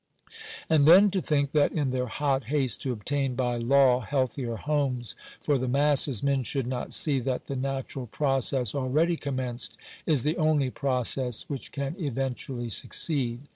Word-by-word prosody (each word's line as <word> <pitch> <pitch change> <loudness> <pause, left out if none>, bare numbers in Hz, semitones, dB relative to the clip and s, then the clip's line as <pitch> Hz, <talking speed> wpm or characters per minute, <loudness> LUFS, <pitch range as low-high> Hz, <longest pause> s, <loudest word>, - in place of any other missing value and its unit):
And 155 -3 +4
then 190 +5 +8
to 190 -1 0
think 140 -3 0
that, 150 -2 +3
in 145 -5 0
their 125 0 -1
hot 135 +1 -1
haste 135 -2 0
to 130 - -2
obtain 130 +4 -2
by 125 -1 -1
law 125 +1 +4
healthier 130 -1 -2
homes 135 -3 -1 0.2
for 145 -3 +1
the 130 - -2
masses, 140 -2 +2
men 140 -1 +2
should 130 +3 -2
not 125 0 -4
see 145 -4 +3
that 130 0 -3
the 140 - -5
natural 135 -1 -4
process 135 -2 0
already 145 +6 +1
commenced 130 -5 -4 0.3
is 145 -7 +3
the 155 +2 0
only 155 -5 +2
process 125 -3 -1
which 140 -3 -6
can 140 +2 -4
eventually 130 -4 -3
succeed. 125 0 -1
135 Hz, 160 wpm, -27 LUFS, 125-145 Hz, 0.3 s, then